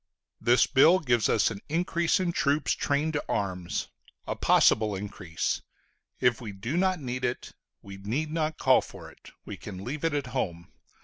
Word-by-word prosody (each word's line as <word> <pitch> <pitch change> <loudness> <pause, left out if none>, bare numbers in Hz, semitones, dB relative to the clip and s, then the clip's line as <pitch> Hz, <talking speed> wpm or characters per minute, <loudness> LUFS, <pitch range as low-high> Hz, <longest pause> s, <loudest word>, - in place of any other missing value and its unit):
The 120 +1 +4
bill 165 +7 +7
gives 120 - +1
us 110 - +3
an 100 -2 -7
increase 170 +2 +1
in 180 -2 0
troops 145 -2 +1
trained 145 +3 0
to 145 - -1
arms 90 -3 -2 0.4
a - - -3
possible 110 -2 +3
increase: 95 -5 -3 0.6
if 125 -2 +2
we 110 -4 -6
do 100 +9 -4
not 185 0 +2
need 125 -2 -4
it, 125 0 -3 0.3
we 100 -1 -9
need 125 +11 -3
not 155 -1 -1
call 130 -1 +4
for - - -11
it; - - -17 0.2
we - - -7
can 95 +1 -8
leave 140 +7 -5
it 165 -2 +1
at 145 -1 -1
home. 85 -1 -3
125 Hz, 175 wpm, -28 LUFS, 100-155 Hz, 0.6 s, bill